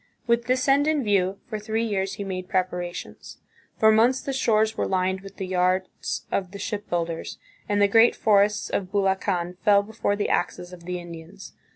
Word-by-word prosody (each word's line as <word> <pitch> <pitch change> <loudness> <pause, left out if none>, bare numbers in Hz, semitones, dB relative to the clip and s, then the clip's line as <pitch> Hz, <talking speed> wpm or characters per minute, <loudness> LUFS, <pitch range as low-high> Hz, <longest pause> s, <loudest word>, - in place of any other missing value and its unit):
With 235 0 +1
this 255 +2 0
end 280 +2 +4
in 310 -3 +1
view, 195 -2 +1
for 215 -2 -5
three 220 +2 -2
years 195 -3 -1
he 200 - -5
made 185 -2 -5
preparations. 180 -1 -3 0.4
For 220 0 +5
months 235 +4 +4
the 275 - -4
shores 220 -4 +2
were - - -1
lined 190 0 0
with 195 0 -12
the 190 - -4
yards 185 0 -1
of 185 -2 -1
the - - -6
shipbuilders, 175 -6 -3 0.3
and 205 0 +1
the 205 - +5
great 225 +3 +5
forests 205 -1 +2
of 185 -2 -2
Bulacan 190 -3 0
fell 200 -1 +4
before 210 -1 -2
the 205 - -1
axes 175 0 -2
of 170 -1 -12
the 180 0 -3
Indians. 175 +3 -11
200 Hz, 185 wpm, -25 LUFS, 185-220 Hz, 0.4 s, For